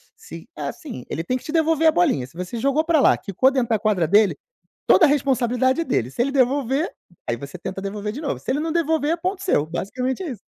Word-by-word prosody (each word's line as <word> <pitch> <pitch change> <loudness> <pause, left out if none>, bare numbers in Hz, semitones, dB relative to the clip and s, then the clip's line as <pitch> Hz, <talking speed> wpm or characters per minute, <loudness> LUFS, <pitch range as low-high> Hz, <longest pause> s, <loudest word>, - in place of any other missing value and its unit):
se - - -11
é - - -8
assim, 280 - -6
ele 165 - -3
tem 250 - -1
que - - -13
te 305 - -6
devolver 325 0 +2
a - - +7
bolinha. 310 - +1
Se 145 - -19
você 180 +6 -5
jogou 275 +5 +1
pra 325 -1 +2
lá, - - +5
quicou 210 +6 +2
dentro 260 -3 -1
da 220 -2 +2
quadra 195 -6 +1
dele, 205 +4 +4 0.5
toda 340 - +6
a - - +3
responsabilidade 260 0 +1
é - - 0
dele. 125 - -1
Se 235 - -2
ele 270 +3 +1
devolver, 275 +3 +1 0.4
aí 120 - 0
você 140 +7 -9
tenta 190 +2 -6
devolver 205 +1 -4
de 285 - -6
novo. 300 - -2
Se - - -3
ele 275 - 0
não 320 +1 -2
devolver, 320 -2 +1
é - - -2
ponto 370 +3 -3
seu, 155 - +2
basicamente 250 - -3
é 345 - -4
isso. 230 - -8
260 Hz, 250 wpm, -22 LUFS, 200-315 Hz, 0.5 s, a